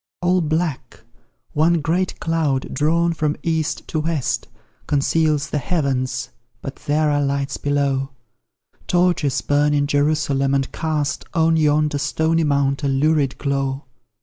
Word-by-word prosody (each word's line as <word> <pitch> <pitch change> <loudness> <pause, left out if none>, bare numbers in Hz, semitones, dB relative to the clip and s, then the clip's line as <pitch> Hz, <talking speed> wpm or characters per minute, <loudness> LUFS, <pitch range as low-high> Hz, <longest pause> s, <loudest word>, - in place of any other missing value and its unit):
All 180 +1 +3
black 155 -6 -2 0.5
one 165 +3 +3
great 175 +5 -1
cloud, 155 -5 -1
drawn 170 +3 +2
from 150 -1 -1
east 160 -2 -1
to 155 - -1
west, 155 -4 -1 0.4
Conceals 150 +1 +1
the 150 - 0
heavens, 135 -4 -1 0.3
but 135 +2 -7
there 150 +1 +1
are 145 0 +1
lights 140 0 -1
below; 140 -2 0 0.8
Torches 175 -6 +2
burn 145 +1 +2
in 145 0 +2
Jerusalem, 145 -2 +1
and 135 -1 -1
cast 155 -3 -2
On 165 0 +3
yonder 150 -1 +2
stony 160 +3 +1
mount 140 -1 +1
a 140 - 0
lurid 140 0 +1
glow. 135 -1 -2
150 Hz, 130 wpm, -21 LUFS, 140-160 Hz, 0.8 s, All